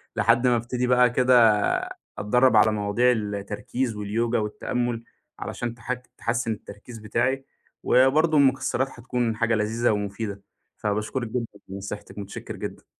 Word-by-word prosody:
لحد 120 Hz, +2 st, +3 dB
ما 120 Hz, -, +4 dB
ابتدي 120 Hz, +2 st, -1 dB
بقى 125 Hz, 0 st, +5 dB
كده 125 Hz, +1 st, +3 dB, 0.8 s
أتدرّب 125 Hz, +3 st, +3 dB
على 110 Hz, +1 st, +6 dB
مواضيع 105 Hz, +4 st, +2 dB
التركيز 105 Hz, +2 st, -3 dB
واليوجا 115 Hz, +3 st, 0 dB
والتأمل 115 Hz, +2 st, -2 dB, 0.4 s
علشان 120 Hz, -1 st, -4 dB
تح 120 Hz, +2 st, -3 dB, 0.2 s
تحسن 115 Hz, 0 st, -1 dB
التركيز 110 Hz, +2 st, -9 dB
بتاعي. 130 Hz, +5 st, -1 dB, 0.4 s
وبرضو 150 Hz, +5 st, +4 dB
المكسرات 135 Hz, -1 st, +2 dB
هتكون 120 Hz, -1 st, -2 dB
حاجة 115 Hz, 0 st, +1 dB
لذيذة 110 Hz, +2 st, +1 dB
ومفيدة، 100 Hz, 0 st, -3 dB, 0.4 s
فباشكرِك 110 Hz, +4 st, -2 dB
جدًا 120 Hz, +1 st, -2 dB, 0.2 s
لنصيحتِك، 100 Hz, +2 st, -7 dB
متشكّر 100 Hz, -1 st, -7 dB
جدًا. -, -, -7 dB
115 Hz, 125 wpm, -25 LUFS, 105-125 Hz, 0.8 s, على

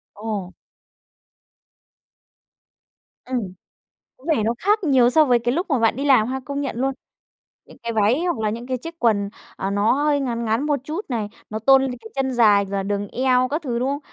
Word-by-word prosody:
Ồ! 205 Hz, -3 st, -4 dB, 2.8 s
Ừm, 255 Hz, 0 st, -1 dB, 0.8 s
có 255 Hz, -, -20 dB
vẻ 290 Hz, -10 st, +2 dB
nó 230 Hz, +2 st, +1 dB
khác 415 Hz, +3 st, +2 dB
nhiều 260 Hz, -6 st, +4 dB
so 310 Hz, +4 st, +5 dB
với 245 Hz, -3 st, +3 dB
cái 240 Hz, +1 st, 0 dB
lúc 350 Hz, +6 st, -1 dB
mà 265 Hz, -6 st, +2 dB
bạn 225 Hz, 0 st, +2 dB
đi 275 Hz, -, -3 dB
làm 255 Hz, -6 st, +5 dB
ha, 265 Hz, +1 st, -3 dB
công 280 Hz, +1 st, -3 dB
nhận 280 Hz, -, -3 dB
luôn. 270 Hz, +1 st, 0 dB, 0.7 s
Những -, -, -16 dB
cái 235 Hz, 0 st, -3 dB
váy 220 Hz, +9 st, +2 dB
hoặc 350 Hz, -8 st, 0 dB
là 215 Hz, -1 st, 0 dB
những 235 Hz, +3 st, -5 dB
cái 255 Hz, -1 st, -1 dB
chiếc 330 Hz, +6 st, -9 dB
quần, 205 Hz, -4 st, +2 dB, 0.3 s
à, 195 Hz, -, -2 dB
nó 205 Hz, +2 st, +2 dB
hơi 290 Hz, +1 st, +1 dB
ngắn 235 Hz, -4 st, -2 dB
ngắn 225 Hz, +5 st, 0 dB
một 290 Hz, -3 st, +1 dB
chút 320 Hz, +9 st, -5 dB
này, 220 Hz, -4 st, -2 dB, 0.2 s
nó 215 Hz, +1 st, -4 dB
tôn 270 Hz, +4 st, +5 dB
lên 265 Hz, -, -1 dB
cái 225 Hz, -, -11 dB
chân 265 Hz, -1 st, 0 dB
dài 210 Hz, -4 st, +4 dB
và 195 Hz, 0 st, -3 dB
đường 205 Hz, 0 st, -2 dB
eo 255 Hz, +1 st, +2 dB
các 300 Hz, +5 st, -2 dB
thứ, 240 Hz, -5 st, -2 dB
đúng 255 Hz, -, 0 dB
không? 285 Hz, +1 st, -2 dB
250 Hz, 210 wpm, -22 LUFS, 220-280 Hz, 2.8 s, so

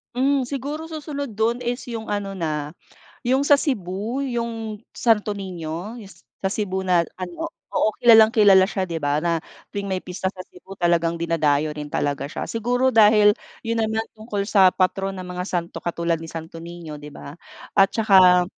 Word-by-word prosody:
Hmm, 275 Hz, +2 st, +2 dB
siguro 285 Hz, +5 st, -5 dB
susunod 290 Hz, -3 st, -5 dB
do'n 235 Hz, +2 st, +1 dB
is 245 Hz, +1 st, -3 dB
yung 225 Hz, -3 st, -6 dB
ano 205 Hz, -1 st, -2 dB
na, 155 Hz, -4 st, -3 dB, 0.5 s
yung 260 Hz, +3 st, +2 dB
sa 285 Hz, 0 st, +5 dB
Cebu 220 Hz, -, -2 dB
yung 230 Hz, -4 st, -3 dB, 0.2 s
Santo 215 Hz, -3 st, +2 dB
Nino 185 Hz, +2 st, -6 dB
yung 200 Hz, -5 st, -11 dB
sa 190 Hz, +3 st, -6 dB
Cebu 190 Hz, -3 st, -2 dB
na 180 Hz, -2 st, +4 dB, 0.2 s
ano 185 Hz, -, -5 dB, 0.2 s
oo, -, -, +2 dB
kilalang 225 Hz, -2 st, +7 dB
kilala 200 Hz, -4 st, +5 dB
siya 190 Hz, -3 st, -1 dB
'di 165 Hz, -2 st, -4 dB
ba 145 Hz, 0 st, +1 dB
na 165 Hz, -1 st, +1 dB, 0.3 s
tuwing 200 Hz, -1 st, -4 dB
may 185 Hz, -1 st, -3 dB
pista 185 Hz, +1 st, -3 dB
sa 185 Hz, -1 st, -9 dB
Cebu 190 Hz, +2 st, -14 dB
talagang 170 Hz, -1 st, +1 dB
dinadayo 155 Hz, -3 st, +1 dB
rin 150 Hz, -1 st, -7 dB
talaga 140 Hz, -1 st, -2 dB
siya. -, -, -5 dB
Siguro 245 Hz, +3 st, 0 dB
dahil 210 Hz, -1 st, +6 dB, 0.3 s
yun 230 Hz, 0 st, 0 dB
naman 220 Hz, 0 st, 0 dB
tungkol 215 Hz, -2 st, -4 dB
sa 195 Hz, -2 st, +5 dB
patron 195 Hz, +1 st, 0 dB
ng 185 Hz, -, -6 dB
mga 180 Hz, 0 st, -5 dB
santo 170 Hz, -1 st, -3 dB
katulad 170 Hz, -1 st, -1 dB
ni 165 Hz, -, -8 dB
Santo 165 Hz, 0 st, -8 dB
Nino 170 Hz, -3 st, -8 dB
'di 145 Hz, -, -9 dB
ba 140 Hz, -1 st, -10 dB, 0.4 s
at 195 Hz, -1 st, +5 dB
saka, 190 Hz, -4 st, +5 dB
195 Hz, 175 wpm, -23 LUFS, 170-225 Hz, 0.5 s, kilalang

